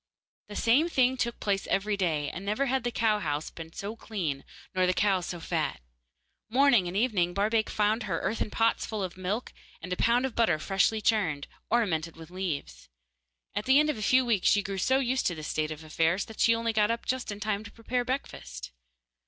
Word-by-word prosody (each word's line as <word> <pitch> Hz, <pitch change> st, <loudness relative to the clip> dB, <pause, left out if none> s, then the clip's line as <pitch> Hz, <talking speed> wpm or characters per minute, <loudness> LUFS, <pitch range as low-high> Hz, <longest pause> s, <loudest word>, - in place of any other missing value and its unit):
The 205 Hz, -, -9 dB
same 265 Hz, +11 st, +3 dB
thing 260 Hz, -4 st, +3 dB
took 235 Hz, -2 st, -2 dB
place 200 Hz, -1 st, -1 dB
every 205 Hz, +1 st, +1 dB
day, 160 Hz, -7 st, 0 dB
and 185 Hz, -, -7 dB
never 210 Hz, +7 st, 0 dB
had 265 Hz, -1 st, 0 dB
the 245 Hz, -, 0 dB
cow 220 Hz, -2 st, +2 dB
house 150 Hz, -4 st, -2 dB
been 165 Hz, -1 st, -9 dB
so 200 Hz, +5 st, -5 dB
clean 170 Hz, -12 st, -3 dB, 0.3 s
nor 185 Hz, -1 st, +2 dB
the 180 Hz, -, +1 dB
cows 190 Hz, -4 st, +2 dB
so 175 Hz, -, -5 dB
fat. 160 Hz, -3 st, -2 dB, 0.7 s
Morning 245 Hz, -6 st, +4 dB
and 180 Hz, +3 st, -3 dB
evening 195 Hz, -7 st, +1 dB
Barbaik 215 Hz, +2 st, +1 dB
found 215 Hz, +2 st, +1 dB
her 165 Hz, -, 0 dB
earthen 215 Hz, +2 st, -1 dB
pots 225 Hz, +1 st, +1 dB
full 215 Hz, -3 st, -3 dB
of 180 Hz, -2 st, -4 dB
milk 190 Hz, +6 st, -3 dB, 0.3 s
and 180 Hz, +2 st, -4 dB
a -, -, -1 dB
pound 240 Hz, +6 st, +3 dB
of 265 Hz, -, -3 dB
butter 220 Hz, -9 st, +3 dB
freshly 195 Hz, +6 st, +1 dB
churned, 185 Hz, -11 st, +1 dB, 0.2 s
ornamented 170 Hz, -9 st, +1 dB
with 165 Hz, +1 st, -12 dB
leaves. 155 Hz, -, -4 dB, 0.6 s
At 205 Hz, +1 st, -2 dB
the 265 Hz, +2 st, +6 dB
end 300 Hz, 0 st, +3 dB
of 295 Hz, -, -7 dB
a -, -, -5 dB
few 255 Hz, +4 st, +4 dB
weeks 220 Hz, -6 st, +2 dB
she 205 Hz, 0 st, +3 dB
grew 195 Hz, 0 st, -4 dB
so 260 Hz, +7 st, +3 dB
used 260 Hz, -1 st, +1 dB
to 175 Hz, -, -1 dB
this 155 Hz, -1 st, -6 dB
state 155 Hz, 0 st, -1 dB
of 155 Hz, 0 st, -7 dB
affairs 165 Hz, +4 st, +1 dB
that 220 Hz, -, -12 dB
she 230 Hz, -, +5 dB
only 230 Hz, 0 st, -1 dB
got 210 Hz, 0 st, +3 dB
up 230 Hz, 0 st, -2 dB
just 255 Hz, -4 st, -2 dB
in 205 Hz, -, -6 dB
time 210 Hz, 0 st, -1 dB
to 205 Hz, -, -10 dB
prepare 245 Hz, +2 st, -2 dB
breakfast. 65 Hz, -, -5 dB
205 Hz, 215 wpm, -28 LUFS, 175-230 Hz, 0.7 s, the